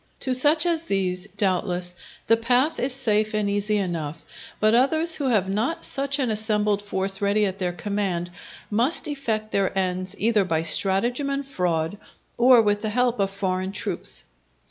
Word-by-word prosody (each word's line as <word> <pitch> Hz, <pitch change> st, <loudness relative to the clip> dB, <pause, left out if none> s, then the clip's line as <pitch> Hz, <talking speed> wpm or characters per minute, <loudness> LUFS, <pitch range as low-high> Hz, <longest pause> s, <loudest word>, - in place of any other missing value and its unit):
To 260 Hz, -, +1 dB
such 295 Hz, +6 st, +4 dB
as 335 Hz, -2 st, +2 dB
these, 185 Hz, -, -2 dB
doubtless, 180 Hz, -2 st, 0 dB, 0.3 s
the 230 Hz, -, +5 dB
path 245 Hz, +7 st, +1 dB
is 260 Hz, -, 0 dB
safe 215 Hz, -4 st, 0 dB
and 210 Hz, -1 st, 0 dB
easy 205 Hz, +1 st, 0 dB
enough; 165 Hz, -5 st, -3 dB, 0.3 s
but 215 Hz, +1 st, +3 dB
others 315 Hz, +7 st, +3 dB
who 290 Hz, -, -1 dB
have 215 Hz, -7 st, +2 dB
not 230 Hz, -, -2 dB
such 275 Hz, +1 st, -1 dB
an 255 Hz, -5 st, 0 dB
assembled 210 Hz, -1 st, 0 dB
force 195 Hz, -1 st, -1 dB
ready 205 Hz, +1 st, +2 dB
at 195 Hz, 0 st, -3 dB
their 180 Hz, -2 st, 0 dB
command, 180 Hz, -1 st, -3 dB, 0.4 s
must 240 Hz, +10 st, +1 dB
effect 225 Hz, -7 st, -3 dB
their 195 Hz, -1 st, 0 dB
ends 185 Hz, 0 st, -1 dB
either 220 Hz, -1 st, +2 dB
by 165 Hz, -3 st, -1 dB
stratagem 235 Hz, -, +2 dB
and 275 Hz, 0 st, -2 dB
fraud, 180 Hz, -7 st, -2 dB, 0.4 s
or 245 Hz, -1 st, +6 dB
with 205 Hz, -1 st, +1 dB
the 215 Hz, -, -2 dB
help 245 Hz, +1 st, +1 dB
of 195 Hz, -1 st, +1 dB
foreign 190 Hz, -1 st, -2 dB
troops. -, -, -4 dB
210 Hz, 165 wpm, -24 LUFS, 190-250 Hz, 0.4 s, or